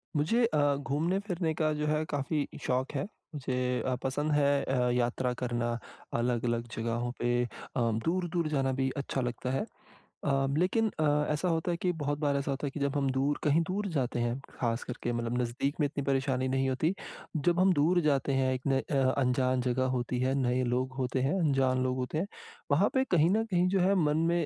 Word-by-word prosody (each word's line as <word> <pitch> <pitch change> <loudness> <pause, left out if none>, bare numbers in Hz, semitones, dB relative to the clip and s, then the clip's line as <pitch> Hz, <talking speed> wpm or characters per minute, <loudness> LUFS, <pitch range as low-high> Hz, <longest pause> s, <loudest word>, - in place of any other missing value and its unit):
मुझे 225 +12 +3
अ, 145 -9 +2
घूमने-फिरने 170 +5 -1
का 155 0 +1
जो 150 0 -2
है 155 +1 +1
काफ़ी 145 +1 -1 0.2
शौक़ 130 +3 0
है। - - -1 0.3
मुझे 125 -2 -1
अ, 130 - +1
पसंद 145 +3 -1
है 145 -1 +3
अ, 125 -2 +1
यात्रा 125 +1 0
करना 120 -1 -1 0.4
अलग-अलग 120 -1 0
जगहों 115 +1 -2
पे 120 0 +2
अ, - - -6 0.6
दूर-दूर 175 -1 0
जाना 135 -3 +1
भी 135 0 +2
अच्छा 140 -1 -2
लगता 125 +1 -3
है 135 +10 0 0.6
अ, 135 -1 +2
लेकिन 205 +6 +2
अ, - - +2 0.3
ऐसा 150 +5 -1
होता 165 0 0
है 170 - -1
कि 180 +1 0
बहुत 145 +1 -1
बार 145 -2 +1
ऐसा 140 0 -1
होता 135 +1 -2
है - - -4
कि 150 - -6
जब 140 0 0
हम 140 -1 +1
दूर 135 +3 0
कहीं 150 +2 +4
दूर 205 +2 -1
जाते 125 -2 -1
हैं, 120 +2 -1 0.2
ख़ास 115 -1 0
करके 120 -1 -4
मतलब 120 +1 -1
नज़दीक 135 +5 -2
में 150 - +3
इतनी 140 0 -4
परेशानी 130 -1 +1
नहीं 135 0 +1
होती, 155 +7 +1 0.5
जब 175 0 +4
हम 185 0 +5
दूर 170 +4 +3
जाते 140 -1 +2
हैं 130 0 +2
एक 130 - -3
न 135 -1 +3
अ, 135 -2 +3
अनजान 125 0 +2
जगह 130 +1 +1
होती 125 0 -2
है, 130 +1 +2
नए 125 +1 +1
लोग 130 +1 -1
होते 130 0 0
हैं, 140 +9 +1
अनजान 135 -4 +2
लोग 130 0 0
होते 130 +4 -2
हैं, 180 +5 -1 0.4
वहाँ 165 +9 +4
पे 265 - +3
कहीं 165 0 +5
न 220 +2 +2
कहीं 180 0 +3
जो - - +4
है 190 +2 +3
मन 150 +1 +2
में 170 0 +2
135 Hz, 205 wpm, -30 LUFS, 125-155 Hz, 0.6 s, हम